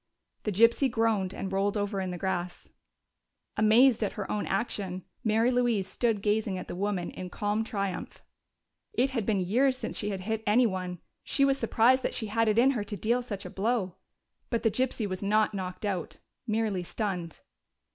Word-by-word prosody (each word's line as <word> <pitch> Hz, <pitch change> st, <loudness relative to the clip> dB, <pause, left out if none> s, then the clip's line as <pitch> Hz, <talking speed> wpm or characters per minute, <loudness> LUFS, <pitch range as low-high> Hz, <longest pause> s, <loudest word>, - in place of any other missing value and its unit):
The 210 Hz, -, 0 dB
gypsy 230 Hz, +7 st, +4 dB
groaned 225 Hz, -5 st, +1 dB
and 190 Hz, -, -5 dB
rolled 200 Hz, +2 st, +1 dB
over 205 Hz, -1 st, -1 dB
in 185 Hz, -, -2 dB
the 180 Hz, -, -4 dB
grass. 180 Hz, -1 st, -3 dB, 0.9 s
Amazed 225 Hz, +3 st, +5 dB
at 205 Hz, -, -1 dB
her 205 Hz, -2 st, -5 dB
own 210 Hz, -, -1 dB
action, 190 Hz, -3 st, -2 dB, 0.2 s
Mary 225 Hz, +3 st, +3 dB
Louise 240 Hz, -6 st, +1 dB
stood 220 Hz, -1 st, 0 dB
gazing 210 Hz, -2 st, +1 dB
at 185 Hz, -, -6 dB
the -, -, -5 dB
woman 195 Hz, -2 st, -2 dB
in 185 Hz, -, -7 dB
calm 210 Hz, +2 st, -1 dB
triumph. 200 Hz, -4 st, -4 dB, 0.7 s
It 275 Hz, -10 st, +2 dB
had 230 Hz, -6 st, -2 dB
been 205 Hz, -4 st, +2 dB
years 255 Hz, +8 st, +2 dB
since -, -, -4 dB
she 210 Hz, -, -2 dB
had 195 Hz, -2 st, -3 dB
hit 220 Hz, +3 st, -2 dB
anyone; 190 Hz, -6 st, +2 dB, 0.3 s
she 275 Hz, -, +2 dB
was 275 Hz, 0 st, +2 dB
surprised 240 Hz, +3 st, +4 dB
that -, -, -2 dB
she 225 Hz, -, -3 dB
had 225 Hz, +2 st, +1 dB
it 215 Hz, 0 st, +2 dB
in 255 Hz, +3 st, +6 dB
her 235 Hz, -6 st, -2 dB
to 205 Hz, 0 st, -6 dB
deal 235 Hz, +6 st, +1 dB
such 205 Hz, -5 st, -6 dB
a -, -, -5 dB
blow. 200 Hz, -3 st, -1 dB, 0.5 s
But 235 Hz, -, -1 dB
the 225 Hz, -, +3 dB
gypsy 250 Hz, -1 st, -1 dB
was 185 Hz, -1 st, -4 dB
not 215 Hz, +1 st, +2 dB
knocked 185 Hz, +1 st, -5 dB
out 185 Hz, -5 st, -3 dB, 0.3 s
merely 215 Hz, -4 st, 0 dB
stunned. 180 Hz, -3 st, -4 dB
210 Hz, 185 wpm, -29 LUFS, 190-230 Hz, 0.9 s, in